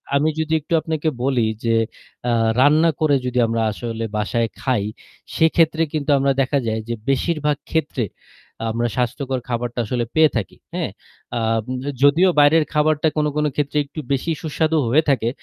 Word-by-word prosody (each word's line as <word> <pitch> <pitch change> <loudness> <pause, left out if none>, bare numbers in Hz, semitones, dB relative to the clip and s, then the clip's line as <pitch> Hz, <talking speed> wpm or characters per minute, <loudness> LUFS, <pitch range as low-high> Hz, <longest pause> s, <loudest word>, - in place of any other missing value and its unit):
আমি 150 +3 +3
যদি 160 0 -1
একটু 160 - -5
আপনাকে 160 -1 -1
বলি 130 -3 +2 0.2
যে 115 0 +3 0.5
আ - - +2 0.3
রান্না 155 +4 +5
করে 145 -2 +4
যদি 125 0 0
আমরা 115 0 -1
আসলে 115 +1 -5
বাসায় 115 +2 0
খাই, 125 -7 +1 0.5
সেক্ষেত্রে 160 0 +3
কিন্তু 150 -1 -2
আমরা 135 0 +2
দেখা 135 +2 +1
যায় 110 0 -1
যে - - 0 0.2
বেশিরভাগ 150 +1 +1
ক্ষেত্রে 145 -7 -1 0.7
আমরা 120 +1 0
স্বাস্থ্যকর 130 +1 -1
খাবারটা 120 0 -2
আসলে 120 +1 -1
পেয়ে 155 -1 +6
থাকি। 100 - -4 0.2
হ্যাঁ, - - -2 0.5
আ - - 0 0.6
যদিও 160 +7 +5
বাইরের 155 +2 +6
খাবারটা 150 +1 +2
কোন, 150 - +2
কোন 150 0 +1
ক্ষেত্রে 145 0 -1
একটু 155 +2 -9
বেশি 140 +5 0
সুস্বাদু 160 0 0
হয়ে 155 +6 +4
থাকে 120 -4 +2
140 Hz, 160 wpm, -21 LUFS, 120-155 Hz, 0.7 s, পেয়ে